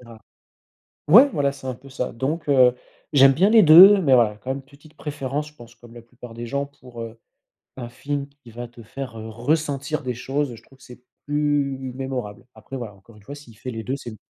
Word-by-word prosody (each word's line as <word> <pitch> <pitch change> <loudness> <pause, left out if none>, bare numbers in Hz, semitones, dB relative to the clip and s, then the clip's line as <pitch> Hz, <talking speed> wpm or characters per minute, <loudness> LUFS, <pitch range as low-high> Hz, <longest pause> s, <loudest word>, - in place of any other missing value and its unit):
ça 115 -2 -14 0.9
ouais 245 - +8
voilà, 140 -1 +1
c'est 135 -1 -11
un 130 - -3
peu 135 +2 -16
ça. 125 -1 -4
Donc, 145 +7 -4
heu, 125 -3 +5 0.4
j'aime 135 -1 +6
bien 190 +7 +3
les 220 -1 +7
2 185 +6 +9
mais 140 -7 +3
voilà, 110 -4 +3
quand 125 - -7
même, 135 +1 -3
petite 145 +3 -20
préférence, 145 0 -4
je 150 - -21
pense 120 -3 -15
comme 115 0 -17
la 120 - -11
plupart 120 0 -13
des 120 0 -7
gens, 140 +3 -3
pour, 125 -4 -12
heu, 115 0 -10 0.6
un 120 -2 -7
film 140 +3 -5 0.2
qui 120 - -14
va 120 +1 -7
te 120 -1 -15
faire, 125 +1 -8
heu, 110 - -8
ressentir 145 +4 -2
des 125 -1 -3
choses, 135 +2 -3
heu, - - -9
je - - -17
trouve 135 0 -23
c'est 125 -1 -15 0.2
plus 145 -3 -1
mémorable. 130 -6 -6
Après 110 +5 -9
voilà, 110 -5 -8
encore 105 +3 -20
une 100 - -19
fois 140 +5 -9
s'il 120 -7 -15
fait 130 - -7
les 110 -1 -6
2 130 +6 -3
c'est 120 - -9
m 110 - -12
130 Hz, 230 wpm, -22 LUFS, 120-145 Hz, 0.9 s, 2